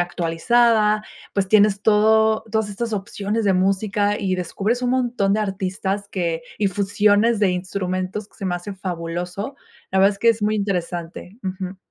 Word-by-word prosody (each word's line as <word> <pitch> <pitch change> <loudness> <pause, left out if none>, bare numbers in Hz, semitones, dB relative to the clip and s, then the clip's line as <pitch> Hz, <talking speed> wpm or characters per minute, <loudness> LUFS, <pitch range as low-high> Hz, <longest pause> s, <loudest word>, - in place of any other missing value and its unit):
actualizada. 210 +6 +2 0.3
Pues, 200 -1 +1
tienes 205 0 +4
todo 220 +1 +4
todas 220 -1 0
estas 225 +2 -3
opciones 205 +2 -3
de 200 - +3
música 200 +2 +1
y 185 -2 -1
descubres 200 +7 -1
un 250 - 0
montón 240 -6 +1
de 215 - +1
artistas 195 0 -3
que 170 -4 -2 0.2
y 205 -2 +1
fusiones 205 +3 +2
de 200 -3 +4
instrumentos 185 +2 -3
que - - -25
se 195 - -3
me 180 - 0
hace 175 +4 -5
fabuloso. 180 +4 -5 0.4
La 190 - +1
verdad, 195 +2 +5
es 200 - -16
que 230 +2 +5
es 225 - -2
muy 215 +1 +2
interesante. 180 -1 -4
Ujú. 185 0 -5
200 Hz, 165 wpm, -22 LUFS, 185-215 Hz, 0.4 s, verdad